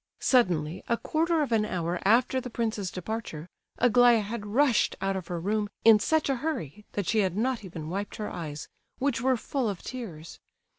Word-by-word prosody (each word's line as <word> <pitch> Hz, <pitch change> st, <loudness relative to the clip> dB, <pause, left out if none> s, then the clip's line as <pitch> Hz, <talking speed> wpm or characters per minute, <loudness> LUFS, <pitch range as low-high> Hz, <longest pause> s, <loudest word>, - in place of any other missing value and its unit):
Suddenly, 180 Hz, -, +2 dB
a 235 Hz, -, +2 dB
quarter 325 Hz, +3 st, +1 dB
of 275 Hz, -, -4 dB
an 220 Hz, -2 st, +3 dB
hour 175 Hz, -3 st, -2 dB
after 245 Hz, +5 st, +3 dB
the 250 Hz, -, -6 dB
prince's 220 Hz, -5 st, -2 dB
departure, 185 Hz, -4 st, -5 dB, 0.3 s
Aglaya 245 Hz, -1 st, +5 dB
had 210 Hz, 0 st, -5 dB
rushed 250 Hz, +2 st, +3 dB
out 195 Hz, 0 st, -1 dB
of 185 Hz, -3 st, -5 dB
her 175 Hz, -1 st, -3 dB
room 205 Hz, +3 st, -1 dB, 0.2 s
in 225 Hz, -2 st, +8 dB
such 315 Hz, +7 st, +1 dB
a 270 Hz, -2 st, +1 dB
hurry 210 Hz, -, -4 dB
that 205 Hz, -, -2 dB
she 220 Hz, -, +1 dB
had 190 Hz, -2 st, +1 dB
not 245 Hz, 0 st, 0 dB
even 165 Hz, -5 st, -7 dB
wiped 200 Hz, +5 st, -4 dB
her 210 Hz, -, -4 dB
eyes, 155 Hz, -4 st, -6 dB, 0.3 s
which 270 Hz, -3 st, 0 dB
were 260 Hz, 0 st, +2 dB
full 255 Hz, 0 st, -2 dB
of 195 Hz, -4 st, -6 dB
tears. 180 Hz, -11 st, -7 dB
215 Hz, 190 wpm, -28 LUFS, 185-245 Hz, 0.3 s, in